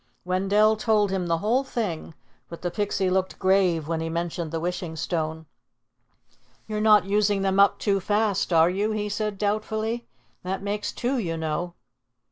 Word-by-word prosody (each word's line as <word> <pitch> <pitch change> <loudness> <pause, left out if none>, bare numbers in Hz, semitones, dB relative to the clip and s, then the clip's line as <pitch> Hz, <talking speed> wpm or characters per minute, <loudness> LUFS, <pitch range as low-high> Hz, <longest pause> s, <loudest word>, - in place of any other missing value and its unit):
Wendell 200 +4 +3
told 210 -2 +2
him 185 -2 -1
the 165 -1 +1
whole 230 +9 +1
thing, 190 - -4 0.3
but 170 - -9
the 175 - -1
Pixie 205 -1 -1
looked 185 0 0
grave 185 -5 +2
when 165 -1 -1
he 165 - -3
mentioned 170 0 -3
the 165 +1 -3
Wishing 175 -1 -3
Stone. 160 -1 -3 1.2
"You're 215 -1 -3
not 210 -3 +5
using 205 0 +1
them 195 0 +1
up 200 0 +5
too 200 -2 +1
fast, 205 0 0
are 165 +1 +5
you?" 205 +3 0
he 210 -1 -2
said 210 0 -2
doubtfully. 220 +3 -2 0.3
"That 190 +2 -4
makes 205 +1 -2
two, 255 +1 -1
you 165 -6 -2
know." 160 +2 -3
195 Hz, 165 wpm, -25 LUFS, 170-210 Hz, 1.2 s, not